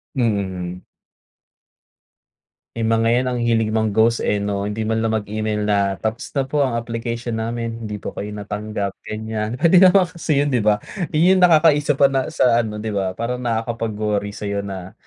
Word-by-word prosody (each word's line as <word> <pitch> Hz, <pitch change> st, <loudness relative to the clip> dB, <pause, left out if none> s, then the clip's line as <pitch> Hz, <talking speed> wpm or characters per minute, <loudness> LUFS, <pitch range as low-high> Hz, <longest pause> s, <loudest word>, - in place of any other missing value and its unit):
Mm. 95 Hz, -7 st, -2 dB, 1.9 s
Eh, 115 Hz, -, -2 dB
mga 115 Hz, 0 st, +2 dB
yan -, -, -3 dB
ang 125 Hz, -, -2 dB
hilig 115 Hz, -2 st, +1 dB
mang-ghost 110 Hz, +1 st, +2 dB
eh, 105 Hz, -, +1 dB
'no. 100 Hz, 0 st, -2 dB
Hindi 105 Hz, +2 st, -3 dB
man 110 Hz, +1 st, 0 dB
lang 110 Hz, 0 st, 0 dB
mag 105 Hz, -1 st, -2 dB
email 110 Hz, 0 st, -1 dB
na 100 Hz, -2 st, +1 dB
tapos 110 Hz, +1 st, -4 dB
na 135 Hz, -, +2 dB
po, 145 Hz, +2 st, 0 dB
ang 125 Hz, -3 st, -2 dB
application 115 Hz, 0 st, -3 dB
namin, 115 Hz, 0 st, -4 dB
hindi 105 Hz, -, -4 dB
po -, -, -6 dB
kayo 105 Hz, -, -5 dB
natanggap 105 Hz, -1 st, -4 dB, 0.2 s
ganyan. 110 Hz, +1 st, -3 dB
Puwede 170 Hz, +5 st, +5 dB
naman 185 Hz, 0 st, +5 dB
kasi 160 Hz, -4 st, 0 dB
yun, 145 Hz, -, -1 dB
'di 125 Hz, -3 st, +2 dB
ba, 105 Hz, 0 st, +3 dB, 0.3 s
yun 180 Hz, +5 st, +4 dB
nakakaisa 155 Hz, -4 st, +5 dB
pa 140 Hz, -, +5 dB
na 135 Hz, -1 st, 0 dB
sa 120 Hz, -2 st, +3 dB
ano 105 Hz, -2 st, -5 dB
'di 110 Hz, +1 st, -4 dB
ba, 95 Hz, -2 st, -1 dB
parang 125 Hz, +2 st, -3 dB
nakakapag-worry 110 Hz, -3 st, -2 dB
sa'yo 100 Hz, -1 st, -3 dB
na, 95 Hz, -2 st, -7 dB
110 Hz, 175 wpm, -21 LUFS, 105-120 Hz, 1.9 s, Puwede